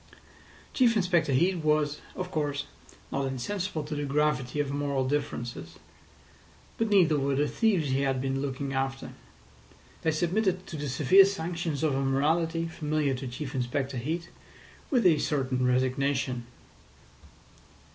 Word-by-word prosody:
Chief 240 Hz, -3 st, +4 dB
Inspector 175 Hz, -6 st, +2 dB
Heat 175 Hz, +8 st, +3 dB
was, 150 Hz, -2 st, +1 dB
of 185 Hz, 0 st, -5 dB
course, 145 Hz, -3 st, -1 dB, 0.5 s
not 135 Hz, 0 st, -1 dB
insensible 160 Hz, +6 st, -3 dB
to 150 Hz, +1 st, -6 dB
the 145 Hz, 0 st, -2 dB
gravity 145 Hz, -2 st, 0 dB
of 145 Hz, -2 st, 0 dB
moral 140 Hz, -2 st, -1 dB
differences. 140 Hz, -4 st, -3 dB, 1.0 s
But 225 Hz, -1 st, +1 dB
neither 170 Hz, -7 st, +4 dB
were 140 Hz, 0 st, 0 dB
the 145 Hz, +2 st, +2 dB
thieves 190 Hz, -, +1 dB
he 135 Hz, +1 st, +1 dB
had 135 Hz, -2 st, +1 dB
been 135 Hz, +1 st, -1 dB
looking 140 Hz, 0 st, -3 dB
after. 135 Hz, 0 st, -2 dB, 0.9 s
They 160 Hz, -, +1 dB
submitted 185 Hz, +4 st, 0 dB
to 170 Hz, -, -8 dB
the 145 Hz, -2 st, -3 dB
severe 170 Hz, +9 st, +6 dB
sanctions 170 Hz, -5 st, -3 dB
of 155 Hz, -3 st, +2 dB
a 135 Hz, +1 st, 0 dB
morality 160 Hz, +5 st, +1 dB
familiar 150 Hz, -3 st, -1 dB
to 130 Hz, +1 st, -5 dB
Chief 130 Hz, +2 st, -6 dB
Inspector 130 Hz, +2 st, -2 dB
Heat 160 Hz, +8 st, -3 dB, 0.6 s
with 250 Hz, -, +2 dB
a 160 Hz, -4 st, +5 dB
certain 130 Hz, -3 st, 0 dB
resignation. 130 Hz, -1 st, 0 dB
145 Hz, 140 wpm, -28 LUFS, 135-165 Hz, 1.0 s, severe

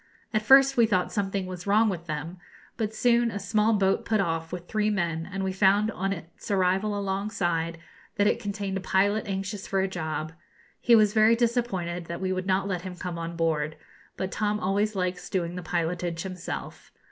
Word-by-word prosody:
At 215 Hz, -, +2 dB
first 270 Hz, +3 st, +6 dB
we 235 Hz, -1 st, +6 dB
thought 185 Hz, -4 st, +1 dB
something 195 Hz, -2 st, -1 dB
was 185 Hz, 0 st, -7 dB
wrong 215 Hz, +3 st, +4 dB
with 175 Hz, -4 st, -3 dB
them; 160 Hz, +3 st, -5 dB, 0.4 s
but 220 Hz, -2 st, -3 dB
soon 240 Hz, 0 st, +3 dB
a 205 Hz, -, -4 dB
small 210 Hz, +3 st, +2 dB
boat 195 Hz, -2 st, +2 dB
put 215 Hz, -1 st, +1 dB
off 165 Hz, -3 st, -1 dB
with 175 Hz, -1 st, -6 dB
three 215 Hz, -1 st, +1 dB
men, 170 Hz, -5 st, -1 dB
and 195 Hz, +1 st, -3 dB
we 190 Hz, -, 0 dB
found, 200 Hz, +3 st, +3 dB
on 195 Hz, -1 st, -2 dB
its 165 Hz, -4 st, -8 dB
arrival 195 Hz, +2 st, +1 dB
alongside, 190 Hz, -4 st, -1 dB, 0.4 s
that 205 Hz, -, +2 dB
it -, -, +2 dB
contained 200 Hz, -1 st, -3 dB
a -, -, -4 dB
pilot 205 Hz, +3 st, +1 dB
anxious 195 Hz, +1 st, -4 dB
for 195 Hz, -, 0 dB
a 190 Hz, -, +2 dB
job. 160 Hz, -3 st, -4 dB, 0.5 s
He 235 Hz, -, +5 dB
was 210 Hz, -2 st, +4 dB
very 220 Hz, +1 st, +5 dB
disappointed 225 Hz, -8 st, -1 dB
that 170 Hz, +1 st, -5 dB
we 185 Hz, 0 st, -1 dB
would 185 Hz, 0 st, -3 dB
not 190 Hz, +1 st, +1 dB
let 180 Hz, -3 st, -2 dB
him 185 Hz, 0 st, -7 dB
come 175 Hz, -1 st, -5 dB
on 165 Hz, 0 st, -5 dB
board; 155 Hz, -2 st, 0 dB, 0.4 s
but 190 Hz, 0 st, -3 dB
Tom 210 Hz, 0 st, 0 dB
always 205 Hz, +3 st, 0 dB
likes 180 Hz, -1 st, -2 dB
doing 175 Hz, -2 st, -2 dB
the 180 Hz, -, -4 dB
pilotage 170 Hz, 0 st, -2 dB
himself. 185 Hz, -2 st, -6 dB
190 Hz, 195 wpm, -27 LUFS, 175-210 Hz, 0.5 s, first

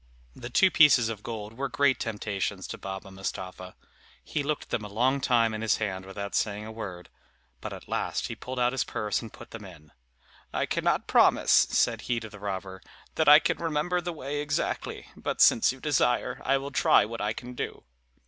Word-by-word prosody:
The 120 Hz, -, -8 dB
two 155 Hz, +9 st, +4 dB
pieces 145 Hz, -9 st, +6 dB
of 110 Hz, -2 st, -5 dB
gold 110 Hz, -2 st, -6 dB
were 135 Hz, +3 st, -3 dB
great 140 Hz, -1 st, +2 dB
temptations 105 Hz, -3 st, -3 dB
to -, -, -5 dB
Baba 95 Hz, 0 st, -7 dB
Mustapha. 95 Hz, -1 st, -6 dB, 0.5 s
He 150 Hz, -, -2 dB
looked 150 Hz, +1 st, -2 dB
at -, -, -21 dB
them 105 Hz, -, -1 dB
a -, -, -5 dB
long 130 Hz, +6 st, +1 dB
time 115 Hz, -3 st, +3 dB
in 110 Hz, -, -4 dB
his 110 Hz, -, +2 dB
hand 95 Hz, -3 st, -3 dB
without 100 Hz, +1 st, -6 dB
saying 105 Hz, 0 st, -1 dB
a 110 Hz, -, -7 dB
word, 95 Hz, -6 st, -7 dB, 0.5 s
but -, -, -6 dB
at -, -, -9 dB
last -, -, -2 dB
he -, -, -5 dB
pulled 130 Hz, 0 st, -7 dB
out 120 Hz, 0 st, +3 dB
his 130 Hz, -1 st, 0 dB
purse 105 Hz, -1 st, -2 dB
and 115 Hz, -, -9 dB
put -, -, -13 dB
them 115 Hz, -2 st, -8 dB
in. 80 Hz, -6 st, -13 dB, 0.6 s
"I -, -, 0 dB
cannot -, -, 0 dB
promise," -, -, +4 dB
said -, -, +4 dB
he 120 Hz, -1 st, -1 dB
to 110 Hz, -1 st, -8 dB
the 105 Hz, -, -11 dB
robber, 95 Hz, -2 st, -5 dB, 0.3 s
"that 160 Hz, -2 st, +3 dB
I 150 Hz, -, +11 dB
can 155 Hz, -, 0 dB
remember 165 Hz, +2 st, 0 dB
the 175 Hz, +1 st, -3 dB
way 145 Hz, -2 st, -4 dB
exactly; 145 Hz, -1 st, -2 dB
but -, -, -4 dB
since 115 Hz, -, +6 dB
you 130 Hz, -, -10 dB
desire, 130 Hz, -4 st, +1 dB
I 135 Hz, +1 st, +3 dB
will 140 Hz, +1 st, -6 dB
try 120 Hz, -, +4 dB
what 115 Hz, +1 st, -6 dB
I 105 Hz, +1 st, 0 dB
can 125 Hz, +2 st, -8 dB
do." -, -, -5 dB
115 Hz, 205 wpm, -28 LUFS, 100-135 Hz, 0.6 s, I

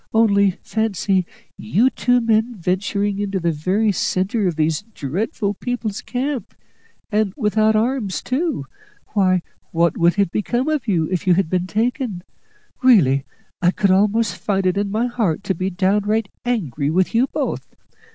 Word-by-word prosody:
Only 200 Hz, -4 st, +4 dB
fancy, 195 Hz, -4 st, 0 dB, 0.3 s
you 230 Hz, +5 st, +2 dB
two 245 Hz, 0 st, +2 dB
men 225 Hz, +1 st, +1 dB
venturing 200 Hz, +2 st, -1 dB
into 200 Hz, -1 st, -1 dB
the 170 Hz, -1 st, 0 dB
very 185 Hz, +8 st, +1 dB
centre 190 Hz, +3 st, 0 dB
of 175 Hz, -, -1 dB
these 155 Hz, +2 st, 0 dB
dreadful 205 Hz, -, -3 dB
people's 225 Hz, -1 st, -4 dB
camp, 255 Hz, -3 st, -3 dB, 0.6 s
and 210 Hz, -2 st, +1 dB
without 215 Hz, -2 st, +2 dB
arms 225 Hz, -3 st, 0 dB
too! 270 Hz, -, -1 dB, 0.4 s
Why, 185 Hz, -4 st, +2 dB, 0.3 s
what 170 Hz, -1 st, +1 dB
would 170 Hz, 0 st, +4 dB
have 200 Hz, -4 st, +1 dB
become 240 Hz, +5 st, -1 dB
of 300 Hz, -6 st, -1 dB
you 170 Hz, -6 st, +1 dB
if 185 Hz, +1 st, -2 dB
you 180 Hz, -, +5 dB
had 185 Hz, -3 st, 0 dB
been 180 Hz, 0 st, 0 dB
taken? 225 Hz, -3 st, -1 dB, 0.6 s
Really, 150 Hz, -, +5 dB, 0.4 s
I 175 Hz, -, +4 dB
could 195 Hz, +1 st, +2 dB
almost 210 Hz, +3 st, +2 dB
find 195 Hz, -2 st, -1 dB
it 185 Hz, 0 st, +2 dB
in 200 Hz, 0 st, -1 dB
my 220 Hz, +4 st, 0 dB
heart 220 Hz, -8 st, -1 dB
to 190 Hz, -, 0 dB
be 185 Hz, +2 st, -2 dB
downright 205 Hz, +3 st, +1 dB, 0.2 s
angry 155 Hz, -, -1 dB
with 185 Hz, +6 st, +1 dB
you 240 Hz, +4 st, +3 dB
both. -, -, -3 dB
200 Hz, 155 wpm, -20 LUFS, 185-225 Hz, 0.6 s, you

